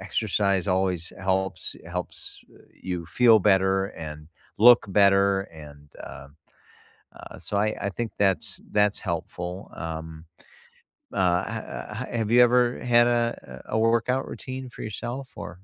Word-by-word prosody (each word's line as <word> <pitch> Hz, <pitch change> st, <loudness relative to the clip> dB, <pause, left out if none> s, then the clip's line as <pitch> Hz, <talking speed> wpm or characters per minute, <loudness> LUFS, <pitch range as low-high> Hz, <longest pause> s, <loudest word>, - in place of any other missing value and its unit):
exercise 100 Hz, -1 st, 0 dB
always 90 Hz, -3 st, 0 dB
helps 95 Hz, 0 st, -1 dB
helps, 90 Hz, 0 st, -5 dB
eh -, -, -19 dB, 0.2 s
you 90 Hz, -3 st, -4 dB
feel 115 Hz, +3 st, +5 dB
better 95 Hz, -1 st, +3 dB
and 75 Hz, -4 st, -8 dB, 0.3 s
look 120 Hz, 0 st, +7 dB
better, 100 Hz, 0 st, +4 dB
and, 75 Hz, -2 st, -13 dB, 0.2 s
um, 70 Hz, +2 st, -11 dB, 0.8 s
uh, -, -, -11 dB
so 100 Hz, -, -3 dB
I 105 Hz, +1 st, +1 dB
I 100 Hz, -, -1 dB
think 115 Hz, +2 st, -4 dB
that's 95 Hz, -2 st, +1 dB
that's 105 Hz, -1 st, +2 dB
helpful, 90 Hz, +1 st, -5 dB
um, 80 Hz, 0 st, -6 dB, 0.9 s
uh, 90 Hz, -1 st, +2 dB
h 110 Hz, +5 st, -6 dB
h -, -, -3 dB
have 110 Hz, -1 st, -2 dB
you 120 Hz, -, +7 dB
ever 125 Hz, +1 st, +4 dB, 0.3 s
had 120 Hz, 0 st, +7 dB
a 115 Hz, -, +2 dB, 0.4 s
a -, -, -2 dB
workout 115 Hz, +3 st, +1 dB
routine 130 Hz, 0 st, -7 dB
for -, -, -8 dB
yourself? 120 Hz, +5 st, -5 dB, 0.2 s
Or -, -, -6 dB
95 Hz, 140 wpm, -25 LUFS, 90-110 Hz, 0.9 s, look